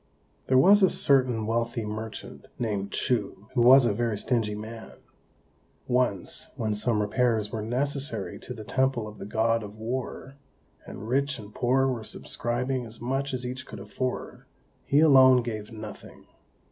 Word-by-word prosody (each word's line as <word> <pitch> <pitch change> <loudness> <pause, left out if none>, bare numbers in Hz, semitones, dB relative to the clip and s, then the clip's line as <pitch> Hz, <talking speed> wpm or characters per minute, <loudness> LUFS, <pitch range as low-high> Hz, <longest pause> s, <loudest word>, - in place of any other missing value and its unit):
There 130 - +4
was 200 +10 +7
a 190 - +6
certain 125 -5 +2
wealthy 115 0 -1
merchant, 110 +1 -7
named 100 -4 -2
Chou, 105 -5 -1
who 125 - +2
was 130 +2 +8
a 115 - +2
very 115 0 -1
stingy 110 -1 -1
man. 110 +1 -8 0.9
Once, 125 -7 0
when 110 -2 -1
some 105 0 +1
repairs 110 -1 +1
were 110 - -3
necessary 130 -1 -2
to - - -8
the 110 - -8
temple 130 0 0
of 105 - -11
the 100 - -7
God 115 +2 +1
of 105 0 -9
War, 130 +4 -5 0.5
and 105 - -8
rich 140 +3 0
and 105 -2 -11
poor 130 +2 +2
were 125 -4 -1
subscribing 125 +4 -3
as 115 -1 -9
much 135 +3 -2
as 125 -1 -3
each 130 +1 -5
could 110 - -9
afford, 115 +6 -5 0.4
he 145 +2 +3
alone 130 -5 +7
gave 110 -2 -5
nothing. 110 -1 -10
120 Hz, 160 wpm, -27 LUFS, 110-130 Hz, 0.9 s, was